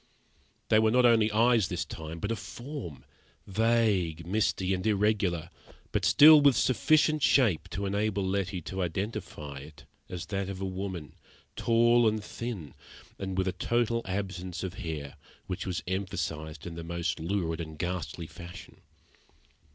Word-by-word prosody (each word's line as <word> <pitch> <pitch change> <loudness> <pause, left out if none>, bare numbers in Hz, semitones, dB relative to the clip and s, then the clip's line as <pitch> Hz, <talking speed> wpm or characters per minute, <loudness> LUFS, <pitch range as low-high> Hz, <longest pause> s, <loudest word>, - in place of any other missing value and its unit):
There 110 - +5
were 110 - +4
not 125 +2 +4
only 115 -2 +5
eyes, 115 -2 +4
this - - -3
time, 80 +1 -7
but 105 +6 -3
a - - 0
form, 120 - -8 0.4
vague, 100 -7 +1
misty, 95 -1 0
and 90 -1 -2
irregular, 100 -5 +1 0.4
but - - 0
still 150 0 +9
with 140 -3 +5
sufficient 155 +4 +3
shape 120 - +3
to 100 0 -3
enable 100 -1 0
Letty 95 -1 -1
to 95 +4 -4
identify 90 -6 -4
it 75 +1 -13 0.2
as 85 -3 -5
that 95 +3 -3
of 95 -1 -5
a 95 - -3
woman, 95 -5 -5 0.4
tall 120 0 +4
and 110 -1 0
thin, 105 -8 -6 0.5
and 95 -1 -4
with 95 0 +1
a - - +2
total 115 +3 0
absence 95 -2 -4
of 95 - -4
hair, 75 -4 -5 0.3
which 90 0 -4
was 90 -2 -2
emphasised 80 -5 -4
in 85 - -6
the 85 0 -7
most 85 0 -2
lurid 85 -1 -1
and 80 -1 -7
ghastly 85 0 -3
fashion. 85 +2 -11
95 Hz, 150 wpm, -29 LUFS, 85-110 Hz, 0.5 s, still